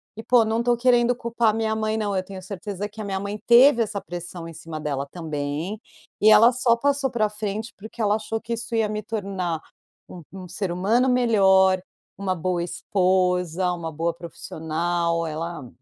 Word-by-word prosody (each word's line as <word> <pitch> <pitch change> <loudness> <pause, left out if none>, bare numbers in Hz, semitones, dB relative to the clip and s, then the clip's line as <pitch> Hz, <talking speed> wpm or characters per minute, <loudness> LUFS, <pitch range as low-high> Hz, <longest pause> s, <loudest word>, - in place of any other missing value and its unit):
E 225 - -7
poxa, 235 -1 +4
não 220 +1 0
estou 240 0 +2
querendo 245 0 +3
culpar 235 -2 0
minha 220 -1 0
mãe 215 0 -1
não, 205 -2 -1
eu 185 - 0
tenho 190 0 -9
certeza 200 +1 -5
que 215 +1 -10
a - - -4
minha 195 -1 -2
mãe 200 +1 -5
teve 240 +1 +7
essa 210 -2 -2
pressão 175 -1 -7
em 165 - -9
cima 160 0 -8
dela 140 -2 -3
também, 160 +4 -4 0.4
e 215 +1 +7
ela 225 +3 +8
só 240 -1 +2
passou 275 +1 +1
pra 215 -3 +1
frente 210 +1 -5
porque 220 +3 -12
ela 210 0 +3
achou 220 +1 -3
que 235 +1 -5
isso 230 0 -4
ia 220 -1 +2
me 215 0 -3
tornar 190 -6 -3 0.5
um 175 - -9
um 185 -1 -9
ser 185 +1 -3
humano 225 +9 +2
melhor, 190 -6 +4 0.4
uma 190 -2 -1
boa 175 0 -1
esposa, 180 -1 +1
uma 165 -2 -5
boa 165 +2 -1
profissional. 170 0 -2
Ela 160 -3 -5
200 Hz, 185 wpm, -24 LUFS, 175-225 Hz, 0.5 s, ela